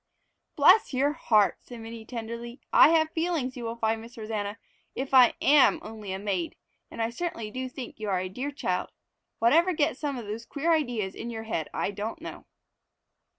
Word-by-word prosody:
"Bless 350 +1 +5
your 280 +3 +2
heart!" 215 -10 +3
said 240 -2 -11
Minnie 225 0 -8
tenderly. 235 +1 -6
"I - - +8
have 315 -1 +3
feelings, 320 -6 -1
you 245 - -6
will 230 0 -3
find, 225 -1 0
Miss 235 +1 -13
Rosanna, 215 -1 -4 0.4
if 270 +1 -4
I 250 -3 +7
am 285 -1 +5
only 215 -2 -7
a 190 - -2
maid, 190 -4 -2 0.3
and 230 - -3
I 225 - -1
certainly 235 -7 -4
do 255 +2 -4
think 250 -2 -8
you 215 -1 -3
are 190 -2 +1
a 185 - -3
dear 250 +10 -4
child. 285 - -2 0.5
Whatever 330 +10 +4
gets 310 0 0
some 285 -3 -2
of 235 - -6
the 215 +3 -5
queer 320 +4 +1
ideas 240 -11 -1
in 235 - -6
your 225 -1 -5
head 165 -8 -3
I - - -1
don't 210 +3 -5
know!" - - -9
235 Hz, 195 wpm, -27 LUFS, 220-285 Hz, 0.5 s, I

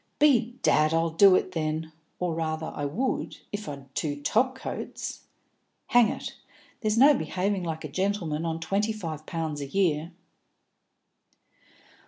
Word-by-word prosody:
"Bedad, 235 - +3
I'll 165 0 +1
do 190 +3 +7
it 185 - 0
then! 160 -1 -2 0.3
Or, 180 -2 -1
rather, 160 0 -2
I 145 - -2
would, 220 - -2
if 205 0 -4
I'd 140 -2 -9
two 145 -2 -2
top 245 - +2
coats. 265 - -6 0.6
Hang 245 -3 +6
it! - - -5 0.5
There's 215 -1 0
no 280 +5 +8
behaving 190 - -1
like 160 -2 -4
a - - -3
gentleman 170 -1 -1
on 165 -1 -2
twenty 200 +6 0
five 160 -7 -6
pounds 160 -4 -3
a 140 - -4
year." 165 -1 +1
165 Hz, 140 wpm, -27 LUFS, 155-210 Hz, 0.6 s, no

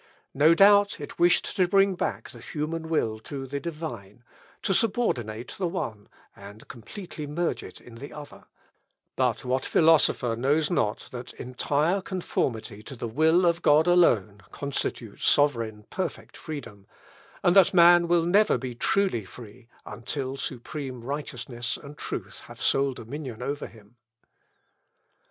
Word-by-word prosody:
No 155 +4 +5
doubt, 200 +1 +5
it 145 - -9
wished 175 0 +3
to 185 -2 +4
bring 195 +1 +4
back 180 - -3
the - - -12
human 160 +1 -4
will 110 -9 0
to 135 +4 -7
the 140 +2 -4
Divine, 130 - -7 0.4
to 195 - +1
subordinate 125 - 0
the 185 - 0
one, 110 - -5 0.3
and 100 +2 -13
completely 155 - -8
merge 170 +4 -2
it - - -11
in 120 - -15
the 130 +5 -9
other; 150 -1 -11 0.7
but - - 0
what 130 +1 0
philosopher 155 -7 +3
knows 145 +7 +1
not 110 -10 -1
that 125 0 -8
entire 145 +8 0
conformity 120 - -3
to 135 +5 -9
the 120 - -5
will 160 +9 +3
of 170 0 +2
God 150 0 +5
alone 115 - +3
constitutes 130 -6 -4
sovereign, 115 -7 +2
perfect 185 -3 -5
freedom; 125 - -8 0.6
and 175 - +4
that 195 -3 +7
man 175 -1 +6
will 170 -1 +3
never 205 +5 +4
be 130 -2 -5
truly 185 - +1
free, 115 +4 -13 0.2
until 130 +2 -4
supreme 130 0 -6
righteousness 120 -3 -4
and 145 +1 -11
truth - - -6
have - - -12
sole 135 -1 +2
dominion 125 -1 -7
over 145 +2 -3
him? 110 +1 -19
145 Hz, 140 wpm, -26 LUFS, 120-170 Hz, 0.7 s, that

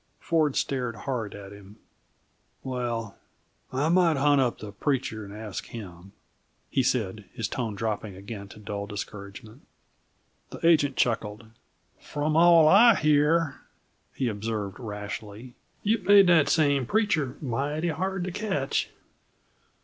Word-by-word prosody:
Ford 155 -4 +1
stared 125 -4 -1
hard 115 -1 -4
at 100 -1 -10
him. 100 0 -13 0.9
"Well, 120 -5 -4 0.5
I 135 +4 0
might 170 -3 +4
hunt 145 0 +4
up 125 -2 0
the 105 - -8
preacher 125 -1 -2
and 100 - -10
ask 105 -1 -7
him," 95 -4 -10 0.6
he 135 - +2
said, 110 -5 -1
his 115 -4 -2
tone 115 -4 -3
dropping 105 -2 -3
again 100 +1 -8
to 105 - -14
dull 100 -1 -5
discouragement. 105 +4 -8 0.9
The - - -6
agent 145 -5 +4
chuckled. 110 -2 -1 0.5
"From 150 +1 -2
all 165 -1 +7
I 215 +7 +7
hear," 150 -1 +2 0.5
he 130 - -1
observed 105 -2 -4
rashly, 105 +1 -7 0.3
"you've 210 -2 0
made 200 -1 +8
that 170 -5 +4
same 145 -5 +2
preacher 155 - 0
mighty 145 +5 -2
hard 185 +3 -2
to 185 - -3
catch!" 180 -9 -1
125 Hz, 130 wpm, -27 LUFS, 105-155 Hz, 0.9 s, made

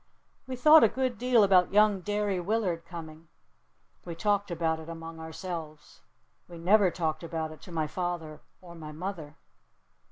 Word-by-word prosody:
We 260 - -4
thought 305 +5 +7
a - - +7
good 255 0 -2
deal 245 -3 +4
about 185 -2 +4
young 210 -1 +4
Derry 205 -1 -1
Willard 180 -3 -1
coming. 165 -1 -10 0.8
We 170 -2 -7
talked 205 +3 0
about 160 -2 -1
it 160 +1 -10
among 165 0 -8
ourselves. 160 -2 -8 0.5
We 175 - -11
never 190 +3 +4
talked 160 -3 -2
about 160 -1 -4
it 155 - -13
to - - -12
my 160 -2 -1
father 170 -2 -4 0.2
or 175 -2 -12
my 155 -2 -9
mother. 160 -2 -6
175 Hz, 160 wpm, -28 LUFS, 160-205 Hz, 0.8 s, thought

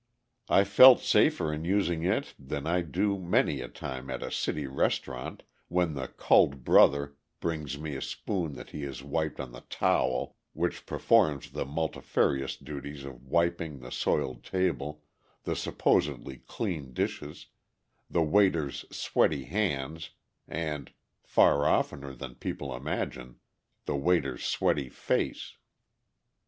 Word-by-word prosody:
I 95 - +6
felt 120 +6 +9
safer 75 -1 +3
in 75 +1 -4
using 85 -3 +1
it 105 +10 0
than 70 +1 -5
I 90 +2 +1
do 100 +5 0
many 85 -6 +1
a 60 - -5
time 65 +1 -7
at 65 -1 -4
a - - -5
city 75 - -1
restaurant 65 0 -2 0.2
when 90 -2 +1
the 65 -2 -4
"culled 70 -2 +3
brother" 70 +2 +5 0.2
brings 75 -4 -3
me 75 -1 -5
a 65 - -5
spoon 90 -7 -3
that 65 - -10
he 75 - -6
has 70 -2 -6
wiped 80 +2 -2
on 65 -3 -5
the - - -10
"towel" 65 0 +1 0.2
which - - -2
performs 75 -3 +2
the - - -3
multifarious 70 -2 -1
duties 70 0 -7
of 65 -1 -11
wiping 85 0 0
the 60 -1 -10
soiled 65 -3 -1
table, 75 -5 -2 0.4
the - - -2
supposedly 65 -1 0
clean 80 - -4
dishes, - - -4 0.6
the 85 - +2
waiter's 80 -4 +2
sweaty 75 -4 +1
hands, 80 -4 -2 0.4
and 75 -4 -4 0.3
far 70 0 +4
oftener 70 -1 0
than - - -8
people - - -5
imagine 60 0 -4 0.5
the 75 - -1
waiter's 85 +5 +1
sweaty 70 -3 0
face. - - -2
75 Hz, 135 wpm, -29 LUFS, 70-85 Hz, 0.6 s, felt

